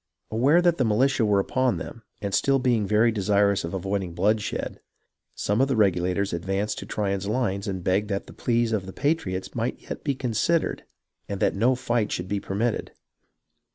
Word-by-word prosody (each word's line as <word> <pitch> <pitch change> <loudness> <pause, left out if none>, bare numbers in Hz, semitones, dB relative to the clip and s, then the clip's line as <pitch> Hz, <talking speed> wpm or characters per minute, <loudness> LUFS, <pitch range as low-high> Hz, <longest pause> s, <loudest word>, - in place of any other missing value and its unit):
Aware 140 +10 +4
that 175 -1 +3
the 130 - +2
militia 125 +3 +2
were 100 -1 +3
upon 130 +5 +1
them, 115 - -7 0.2
and 100 -1 -2
still 135 +8 +3
being 120 -5 +1
very 110 +3 +4
desirous 100 -1 +2
of 85 +2 -4
avoiding 95 -2 -2
bloodshed, 105 +4 -1 0.6
some 105 +4 0
of 135 - +4
the 135 - 0
Regulators 95 -1 +1
advanced 95 +5 -2
to - - -8
Tryon's 100 -2 -2
lines 105 -3 -1
and 95 -2 -3
begged 100 +4 +1
that 100 -1 -2
the - - -12
pleas 120 -1 0
of 100 -4 -1
the 95 - -8
patriots 145 - -1
might - - -2
yet - - -8
be 140 - 0
considered 130 +7 0 0.4
and 100 -1 -3
that - - +2
no 120 +6 +3
fight 120 -3 -1
should 90 - -3
be 100 +1 -1
permitted. 105 +4 -2
105 Hz, 185 wpm, -25 LUFS, 95-120 Hz, 0.6 s, Aware